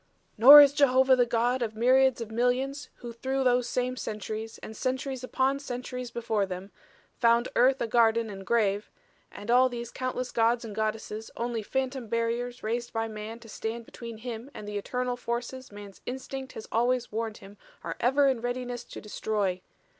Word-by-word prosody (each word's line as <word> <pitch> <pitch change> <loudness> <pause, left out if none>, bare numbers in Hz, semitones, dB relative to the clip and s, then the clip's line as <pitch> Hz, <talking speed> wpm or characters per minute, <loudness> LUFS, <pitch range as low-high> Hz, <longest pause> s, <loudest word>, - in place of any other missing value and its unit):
"Nor 280 +7 +11
is 285 -1 +6
Jehovah 265 -2 +5
the 245 -1 +3
God 240 +2 +1
of 220 -2 -2
myriads 255 +2 +4
of 225 -1 -6
millions 255 +5 0 0.2
who 235 - -6
through 265 +3 -1
those 245 -1 +2
same 250 +1 -1
centuries, 220 -1 -5
and 220 - -8
centuries 260 +1 -3
upon 265 +2 0
centuries 250 -2 -5
before 225 -4 -1
them, 185 +2 -7 0.5
found 235 0 +3
earth 260 +2 +4
a - - 0
garden 230 0 +3
and 195 -2 -8
grave 205 -1 +1 0.4
and 210 +3 -5
all 255 +1 +5
these 240 -1 -6
countless 255 -1 -3
gods 230 +1 +2
and 215 - -7
goddesses 220 0 -3
only 235 -1 -2
phantom 260 +2 -3
barriers 235 +2 -2
raised 235 +2 -2
by 225 0 -1
man 215 +1 -7
to 230 - -13
stand 225 +2 -5
between 230 -1 -9
him 235 +2 -7
and 210 - -8
the 205 0 -3
eternal 250 +4 -2
forces 245 +1 -4
man's 205 -1 -11
instinct 265 +1 -6
has 220 - -8
always 245 +1 +1
warned 220 0 -3
him 200 +1 -14 0.2
are - - -4
ever 275 +3 +3
in 260 -4 +1
readiness 245 0 -3
to - - -10
destroy. 205 -3 -2
235 Hz, 175 wpm, -28 LUFS, 220-255 Hz, 0.5 s, Nor